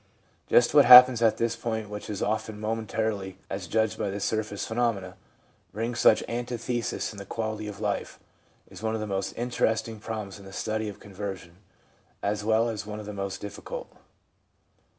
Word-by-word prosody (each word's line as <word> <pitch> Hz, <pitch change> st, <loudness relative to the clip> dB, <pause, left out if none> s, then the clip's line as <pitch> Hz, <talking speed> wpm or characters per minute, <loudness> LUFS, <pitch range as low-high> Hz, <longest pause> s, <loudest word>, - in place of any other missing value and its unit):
Just 120 Hz, -, +4 dB
what 145 Hz, -2 st, +7 dB
happens 125 Hz, -1 st, +10 dB
at 115 Hz, -2 st, +4 dB
this 115 Hz, 0 st, 0 dB
point 110 Hz, -2 st, -3 dB
which 105 Hz, +1 st, -7 dB
often 110 Hz, 0 st, -2 dB
momentarily, 110 Hz, -3 st, -2 dB
as 95 Hz, -2 st, -4 dB
judged 110 Hz, +3 st, 0 dB
by 100 Hz, -, -1 dB
the 100 Hz, +1 st, -4 dB
surface 105 Hz, -1 st, -2 dB
phenomena, 110 Hz, -6 st, -1 dB, 0.6 s
brings 115 Hz, +3 st, -3 dB
such -, -, +5 dB
antitheses 120 Hz, 0 st, -3 dB
in 105 Hz, -, -10 dB
the -, -, -6 dB
quality 110 Hz, +1 st, -4 dB
of 105 Hz, -1 st, -7 dB
life, 105 Hz, -1 st, -3 dB, 0.5 s
is -, -, -12 dB
one 110 Hz, 0 st, -1 dB
of -, -, -2 dB
the 110 Hz, -, -3 dB
most 95 Hz, -1 st, -2 dB
interesting 115 Hz, -2 st, -1 dB
problems 105 Hz, -2 st, -6 dB
in 100 Hz, -, -13 dB
the 95 Hz, -, -11 dB
study 110 Hz, +1 st, -2 dB
of 100 Hz, -, -10 dB
conversion 95 Hz, -3 st, -7 dB, 0.7 s
as 105 Hz, +1 st, -1 dB
well 110 Hz, +2 st, +3 dB
as 110 Hz, -3 st, -3 dB
one 105 Hz, 0 st, -6 dB
of 105 Hz, -, -8 dB
the 105 Hz, -, -6 dB
most 100 Hz, -1 st, -4 dB
difficult. 105 Hz, -, -7 dB
110 Hz, 170 wpm, -27 LUFS, 100-115 Hz, 0.7 s, happens